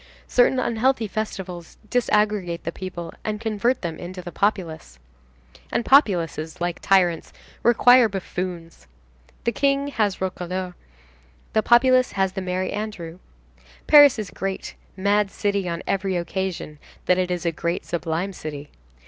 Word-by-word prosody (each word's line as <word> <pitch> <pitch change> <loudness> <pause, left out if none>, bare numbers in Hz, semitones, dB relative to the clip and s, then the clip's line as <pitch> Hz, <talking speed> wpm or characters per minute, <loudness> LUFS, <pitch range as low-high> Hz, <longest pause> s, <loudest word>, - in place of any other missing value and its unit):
Certain 250 +1 +3
unhealthy 235 0 +1
festivals 190 -5 -5
disaggregate 210 -7 +1
the 165 - -3
people 175 -2 -7
and 215 -1 -3
convert 225 +2 0
them 165 -2 -4
into 180 +1 -7
the 175 -1 -7
populace. 170 - -2 0.7
And 230 - 0
populaces, 170 - +2
like 175 -1 -2
tyrants, 180 -4 +2 0.3
require 240 0 +6
buffoons. 180 - -6 0.6
The 235 - +1
King 280 +3 +1
has 210 -8 0
Roquelaure, 185 0 -4 0.8
the 220 - +3
populace 255 +2 +4
has 190 -1 +1
the 190 0 -5
Merry 185 0 -2
Andrew. 200 -5 -5 0.7
Paris 290 -4 +8
is 210 -4 -4
a - - -17
great, 195 0 -4 0.2
mad 200 +1 +2
city 200 -2 -1
on 170 0 -4
every 195 -1 -1
occasion 175 -3 -4 0.3
that 180 0 +3
it 180 -1 0
is 180 -1 -3
a 170 - +2
great 170 +2 -3
sublime 170 +3 -2
city. 150 -4 -7
190 Hz, 140 wpm, -23 LUFS, 175-215 Hz, 0.8 s, Paris